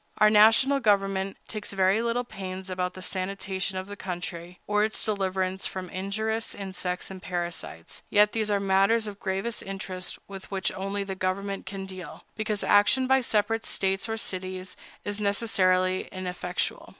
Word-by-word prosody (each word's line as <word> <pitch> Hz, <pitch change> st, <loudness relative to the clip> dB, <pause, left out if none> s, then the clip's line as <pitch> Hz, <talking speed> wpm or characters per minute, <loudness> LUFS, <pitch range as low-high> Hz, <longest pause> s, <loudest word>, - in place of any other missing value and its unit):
Our 215 Hz, 0 st, +6 dB
national 225 Hz, +6 st, +6 dB
government 195 Hz, -3 st, +2 dB
takes 210 Hz, -2 st, -5 dB
very 195 Hz, +3 st, +3 dB
little 235 Hz, +1 st, 0 dB
pains 190 Hz, -4 st, -6 dB
about 180 Hz, 0 st, -1 dB
the 185 Hz, -, -8 dB
sanitation 190 Hz, 0 st, -2 dB
of 185 Hz, -, -3 dB
the 205 Hz, +1 st, -7 dB
country, 180 Hz, -2 st, -6 dB
or 210 Hz, 0 st, +2 dB
its 220 Hz, 0 st, -1 dB
deliverance 190 Hz, -2 st, 0 dB
from 185 Hz, -1 st, -6 dB
injurious 220 Hz, +4 st, -2 dB
insects 185 Hz, -2 st, -3 dB
and 190 Hz, -1 st, -8 dB
parasites; 175 Hz, -, -4 dB
yet 210 Hz, 0 st, +5 dB
these 220 Hz, -2 st, 0 dB
are 205 Hz, -1 st, +3 dB
matters 195 Hz, +3 st, +3 dB
of 205 Hz, -1 st, -6 dB
gravest 200 Hz, +2 st, -2 dB
interest, 190 Hz, -2 st, -5 dB
with 195 Hz, -1 st, -9 dB
which 195 Hz, -1 st, 0 dB
only 195 Hz, +1 st, -2 dB
the 195 Hz, -1 st, -4 dB
general 185 Hz, 0 st, 0 dB
government 195 Hz, -1 st, -5 dB
can 195 Hz, 0 st, -5 dB
deal, 185 Hz, -5 st, -9 dB
because 215 Hz, -1 st, -1 dB
action 205 Hz, +6 st, +5 dB
by 265 Hz, +1 st, +4 dB
separate 225 Hz, -1 st, +1 dB
States 195 Hz, +3 st, +1 dB
or 225 Hz, -, -1 dB
cities 185 Hz, -2 st, -3 dB, 0.3 s
is 205 Hz, +1 st, -2 dB
necessarily 185 Hz, -3 st, +2 dB
ineffectual. 180 Hz, -1 st, -3 dB
195 Hz, 160 wpm, -27 LUFS, 185-210 Hz, 0.3 s, Our